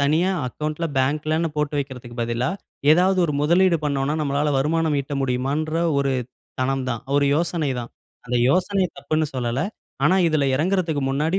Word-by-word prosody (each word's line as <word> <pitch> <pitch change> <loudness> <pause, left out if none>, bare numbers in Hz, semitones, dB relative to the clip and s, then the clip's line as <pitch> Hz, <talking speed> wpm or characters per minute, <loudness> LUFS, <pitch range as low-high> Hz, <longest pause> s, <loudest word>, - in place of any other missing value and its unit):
தனியா 155 +6 +2 0.2
அக்கவுண்ட்ல, 155 +6 -3
பேங்க்லன்னு 155 +4 +1
போட்டு 150 0 -1
வைக்கிறதற்கு 125 -4 -6
பதிலா, 120 +2 -1 0.4
ஏதாவது 185 +3 +3
ஒரு 150 - -1
முதலீடு 170 +4 +4
பண்ணோம்னா, 140 0 0
நம்மால 145 +1 0
வருமானம் 155 +2 +1
ஈட்ட 140 +1 -5
முடியுமான்ற 135 +5 -1 0.2
ஒரு 140 -1 +1 0.5
தனம் 135 0 0
தான். 115 -3 -3
ஒரு 145 - +3
யோசனை 165 -3 0
தான். 120 - -8 0.3
அந்த 125 0 -1
யோசனை 185 +5 +2
தப்புன்னு 155 0 -1
சொல்லல. 120 0 -1 0.4
ஆனா 175 +5 +4
இதுல 155 -3 +1
இறங்குறதுக்கு 165 -1 0
முன்னாடி, 155 +7 +1
150 Hz, 150 wpm, -23 LUFS, 135-165 Hz, 0.5 s, முதலீடு